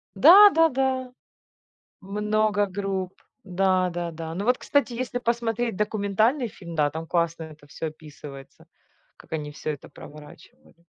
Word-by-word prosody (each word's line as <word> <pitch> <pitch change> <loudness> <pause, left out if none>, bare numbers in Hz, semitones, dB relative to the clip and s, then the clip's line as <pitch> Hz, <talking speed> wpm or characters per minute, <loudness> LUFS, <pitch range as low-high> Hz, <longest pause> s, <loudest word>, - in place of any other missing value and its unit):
Да-да-да, 270 - +5 0.9
много 210 +1 0
групп. 190 -1 -3 0.3
Да-да-да. 175 -3 -1
Ну, 200 - -3
вот, 250 +2 +3
кстати, 275 -4 0
если 245 0 -3
посмотреть 235 -2 -1
документальный 215 +5 0
фильм, 170 -4 -10
да, 150 -2 +2
там 160 +1 -6
классно 170 -1 -1
это 155 -2 -13
всё 160 +3 -5
описывается, 150 -3 -12 0.5
как - - -19
они 150 -2 -4
всё 150 - -6
это 145 - -9
проворачивали. 150 +2 -15
195 Hz, 120 wpm, -25 LUFS, 165-235 Hz, 0.9 s, Да-да-да